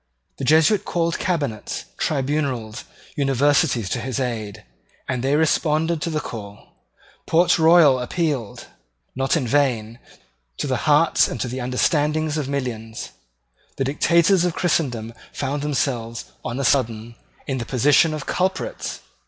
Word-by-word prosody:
The 135 - -3
Jesuit 160 +8 +4
called 170 -1 -1
cabinets, 145 - -2
tribunals, 135 -6 -2 0.3
universities 140 - +2
to - - -2
his 130 -1 -3
aid; 110 - -4 0.4
and 125 -2 -2
they 135 +2 +2
responded 160 +1 +1
to 170 - -2
the 155 -2 -1
call. 105 -7 -9 0.6
Port 170 +1 +3
Royal 160 -5 +6
appealed, 135 - -2 0.5
not 135 +5 +1
in 140 - -1
vain, 120 -4 0 0.6
to - - -2
the - - -1
hearts - - +4
and - - -5
to - - -2
the 125 +2 -5
understandings 150 +5 0
of 145 -3 -2
millions. 115 -5 -4 0.7
The - - 0
dictators 170 +6 +3
of 180 -2 0
Christendom 120 -10 -1 0.2
found 140 +1 -3
themselves, 125 -5 -2 0.2
on 120 +3 -4
a - - -1
sudden, 115 -4 0 0.3
in 135 -2 -2
the 120 - -4
position 145 +5 +4
of 150 - -6
culprits. 185 +1 -2
140 Hz, 135 wpm, -22 LUFS, 120-155 Hz, 0.7 s, Royal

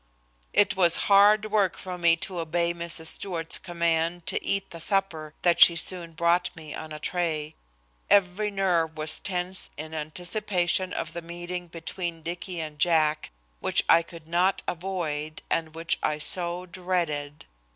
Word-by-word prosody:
It 205 -2 +3
was 175 -3 +5
hard 210 +1 +5
work 200 -4 +2
for 185 -1 -6
me 170 -2 +4
to 185 -3 -6
obey 170 +1 0
Mrs. 170 -1 -2
Stewart's 165 -1 -2
command 170 -1 -1
to - - -1
eat 195 0 -1
the 170 - -8
supper 165 -4 -1
that 175 -1 +3
she 170 - +9
soon 170 0 -1
brought 170 +2 +2
me 155 -3 -9
on 155 0 -7
a 155 - -5
tray. 155 -2 -2 0.6
Every 200 +1 +3
nerve 175 -5 0
was 155 0 +1
tense 185 0 -3
in 155 +2 -7
anticipation 180 +3 -1
of 160 - -4
the 170 - -5
meeting 175 +1 -6
between 165 0 -5
Dicky 175 +1 -5
and 155 -2 -6
Jack, 155 -2 +2 0.3
which - - +2
I 165 - +6
could 165 -2 -12
not 180 +3 +1
avoid, 160 -4 -3
and 160 -1 -1
which 165 0 0
I 150 - 0
so 175 +3 +1
dreaded. 170 -5 -3
170 Hz, 155 wpm, -26 LUFS, 160-180 Hz, 0.6 s, she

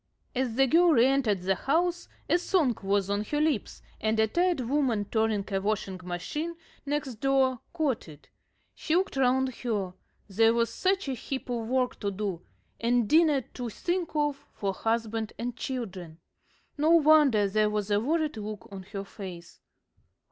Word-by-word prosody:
As 250 -3 -1
the 270 +2 +5
girl 335 +5 +5
re 240 -3 +5
entered 250 -9 +1
the 195 +1 +2
house 340 - 0 0.2
a 350 - +3
song 320 -9 +2
was 195 0 +1
on 200 +1 0
her 295 +6 -1
lips, 300 -8 -1 0.2
and 220 0 0
a 220 - +5
tired 345 +5 +1
woman 245 -4 0
turning 220 -1 0
a 195 - +1
washing 200 -2 -2
machine 180 - -4 0.3
next 280 -5 -2
door 265 -1 +2
caught 300 - -1
it. 150 -1 -15 0.5
She 320 - -1
looked 375 -2 +1
round 260 0 +2
her 205 -7 -2 0.3
there 225 +3 +3
was 230 -1 +1
such 385 -2 0
a 270 - -1
heap 260 +1 -5
of 230 -2 -2
work 255 0 0
to 200 - -1
do 195 -3 -3 0.4
and 235 -1 +2
dinner 310 0 +4
to 245 -2 -4
think 345 - -3
of 295 -2 +1 0.2
for 195 -1 -2
husband 225 +1 -2
and 240 +1 -4
children. 190 -11 -5 0.6
No 305 +2 +3
wonder 300 -10 +5
there 210 +2 +2
was 210 -1 -2
a 205 - +4
worried 305 +3 0
look 215 +1 -6
on 195 -1 -7
her 195 +1 -6
face. 185 -4 -10
235 Hz, 170 wpm, -28 LUFS, 205-290 Hz, 0.6 s, the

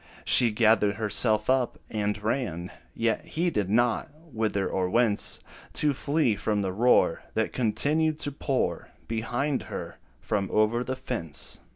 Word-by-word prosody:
She 120 - +6
gathered 105 -2 +3
herself 110 0 +2
up, 130 -1 +1
and 105 -1 -2
ran, 100 -7 -2 0.2
Yet 115 -1 0
heeded 155 - -1
not 120 +1 +1 0.2
whither 105 -4 0
or 95 -1 -1
whence, 115 0 +1 0.3
To 150 -1 +1
flee 140 -4 +1
from 105 0 -1
the 95 -1 -2
roar, 120 +5 +3
That - - 0
continued 150 +7 +1
to 145 - -2
pour 135 -1 -2 0.2
Behind 120 +5 -1
her, - - -7 0.2
from 100 -2 -2
over 110 +3 +2
the 130 +1 -3
fence. 115 - -3
115 Hz, 140 wpm, -27 LUFS, 105-130 Hz, 0.3 s, She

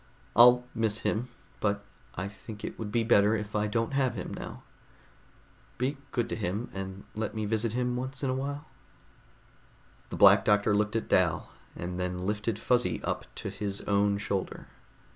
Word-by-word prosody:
I'll 125 +1 +8
miss 110 -2 +1
him, 115 +4 0 0.3
but 100 -1 0 0.3
I 95 +2 -3
think 105 +2 -10
it - - -6
would 105 -2 -4
be 115 0 +2
better 105 -2 +5
if 105 -1 -4
I 105 0 +1
don't 115 +4 -1
have 130 -4 +1
him 95 - -5
now. - - -7 1.1
Be 130 +4 0 0.2
good 120 -2 0
to - - -2
him, 105 +3 -3
and 95 0 -6
let 110 +1 -3
me 110 -1 -1
visit 110 +1 0
him 125 0 0
once 130 +2 -4
in 130 - +1
a - - 0
while." 140 +3 -3 1.4
The - - -5
Black - - +8
Doctor 105 0 +3
looked 105 +1 +1
at 115 - -1
Dal, 85 -4 +2 0.2
and 90 +1 -5
then 90 0 -2
lifted 105 +3 -1
Fuzzy 125 +2 +1
up - - -2
to 100 - -5
his 100 0 -4
own 100 0 +2
shoulder. 100 -2 -3
105 Hz, 175 wpm, -29 LUFS, 100-120 Hz, 1.4 s, I'll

